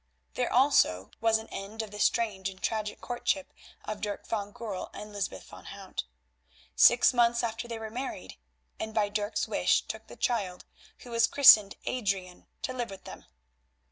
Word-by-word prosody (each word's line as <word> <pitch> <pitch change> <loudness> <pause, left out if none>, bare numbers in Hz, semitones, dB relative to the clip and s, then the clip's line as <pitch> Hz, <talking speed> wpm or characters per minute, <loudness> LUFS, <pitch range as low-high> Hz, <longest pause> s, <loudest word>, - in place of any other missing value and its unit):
There 250 - -1
also 245 - +3
was 225 -1 +4
an 220 0 -9
end 210 +3 -5
of 215 - -9
the 210 - -8
strange 205 -4 +1
and 190 -1 -12
tragic 215 -1 -3
courtship 255 +4 -2 0.3
of 215 -1 -5
Dirk 205 -1 -4
van 205 -2 -3
Goorl 205 -4 -6
and 210 0 -8
Lysbeth 195 - -4
van - - -13
Hout. - - -6 0.7
Six 240 +2 +6
months 235 -1 +3
afterwards 235 +1 -3
they 230 - -4
were 220 -1 -7
married, 230 - -6 0.4
and 220 0 -5
by 210 -2 +2
Dirk's 205 +1 -2
wish - - +2
took - - -7
the - - -11
child, 200 -7 -2 0.4
who 245 - -11
was 230 0 +3
christened 220 -8 +7
Adrian, 195 -7 -3 0.2
to 255 - -2
live 245 -2 -3
with 195 -1 -10
them. - - -11
220 Hz, 170 wpm, -29 LUFS, 200-235 Hz, 0.7 s, christened